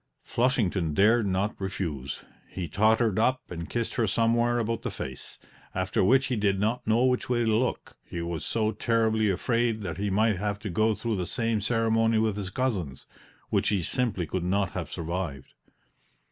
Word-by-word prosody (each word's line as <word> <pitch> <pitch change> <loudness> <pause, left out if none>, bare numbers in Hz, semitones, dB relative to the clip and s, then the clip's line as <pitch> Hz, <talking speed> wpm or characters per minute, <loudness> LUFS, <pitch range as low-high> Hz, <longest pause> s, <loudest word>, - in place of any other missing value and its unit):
Flushington 100 - 0
dared 110 +3 +4
not 95 +2 0
refuse; 80 -9 -4 0.3
he 90 -3 -5
tottered 110 +4 +2
up 130 +3 +3
and 85 -1 -6
kissed 120 -1 -2
her 115 - +1
somewhere 120 +2 +2
about 115 0 -1
the - - -3
face, 65 -1 -7 0.4
after - - 0
which 135 +7 +4
he 130 -2 -1
did 100 -3 +1
not 110 +4 -1
know 115 +3 +3
which 125 -1 +1
way 120 -1 +2
to 110 -1 +2
look, 125 +3 -1
he 85 - -6
was 85 -2 -3
so 110 -1 0
terribly 110 0 +1
afraid 115 +3 0
that 85 -4 -4
he 100 0 0
might 105 +1 +2
have 100 +1 -2
to 105 -1 -6
go 110 +5 +2
through 110 +1 -2
the 90 -2 -2
same 115 +2 0
ceremony 115 0 +2
with 110 -2 +1
his 100 -3 -4
cousins, 95 - -2 0.5
which - - +2
he 100 -4 +1
simply 105 -5 0
could 85 +3 -3
not 95 +1 0
have - - -4
survived. 85 -5 -4
110 Hz, 180 wpm, -27 LUFS, 95-115 Hz, 0.5 s, dared